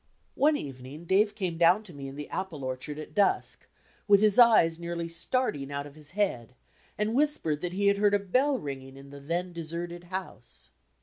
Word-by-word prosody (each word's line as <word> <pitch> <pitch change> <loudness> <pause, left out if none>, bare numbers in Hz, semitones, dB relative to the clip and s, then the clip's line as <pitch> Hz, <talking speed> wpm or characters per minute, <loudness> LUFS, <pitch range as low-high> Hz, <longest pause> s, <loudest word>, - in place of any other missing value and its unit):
One 295 +1 +3
evening 135 +3 -8
Dave 205 +4 +2
came 180 -5 -3
down 175 +5 +5
to 185 -5 -12
me 140 -1 -7
in 135 - -8
the 150 0 -6
apple 180 -7 -5
orchard 130 +3 -4
at 155 - -8
dusk, 205 -2 +1 0.4
with 200 -1 +7
his 210 +1 +4
eyes 190 -9 +6
nearly 170 0 -4
starting 165 - -1
out 140 0 -3
of 145 - -11
his 150 +1 -11
head, 125 - -1 0.4
and 210 +1 0
whispered 250 - +1
that 180 0 -3
he 200 +2 -1
had 200 0 +4
heard 205 0 +3
a - - +5
bell 255 +8 +1
ringing 135 - -7
in 140 0 -13
the 140 - -10
then 175 +5 -3
deserted 170 +1 -5
house. 110 - -8
170 Hz, 195 wpm, -28 LUFS, 140-200 Hz, 0.4 s, with